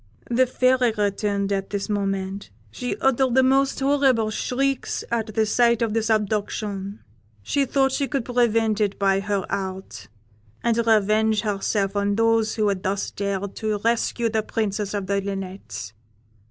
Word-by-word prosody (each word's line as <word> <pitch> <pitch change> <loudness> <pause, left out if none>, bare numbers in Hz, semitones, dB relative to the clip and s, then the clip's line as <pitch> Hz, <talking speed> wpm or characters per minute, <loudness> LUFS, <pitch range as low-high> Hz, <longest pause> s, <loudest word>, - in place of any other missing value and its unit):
"The 255 +2 +3
Fairy 255 -1 +2
returned 200 -1 0
at 195 -1 -1
this 200 -1 -3
moment; 195 -1 -2 0.2
she 245 - -4
uttered 265 -1 +2
the 265 - +5
most 270 +1 +2
horrible 270 -5 +2
shrieks 270 +4 -1
at 220 -2 -2
the 220 - +3
sight 235 +1 +3
of 220 -2 -1
this 225 0 0
abduction; 205 -1 -2 0.4
she 280 - +1
thought 270 0 +2
she 275 +1 -1
could 275 -5 -2
prevent 230 -3 +1
it 205 -2 0
by 195 -1 +2
her 200 -1 -2
art, 190 - -5 0.6
and 235 -1 +2
revenge 215 0 +3
herself 200 -1 -1
on 200 0 +1
those 225 0 +2
who 215 -2 +1
had 195 -2 -2
thus 195 +1 -2
dared 200 0 -3
to 215 -1 -1
rescue 235 0 +1
the 220 0 0
Princess 210 -1 -2
of 200 -2 -2
the 200 +1 0
Linnets. 185 - -6
215 Hz, 155 wpm, -23 LUFS, 200-235 Hz, 0.6 s, the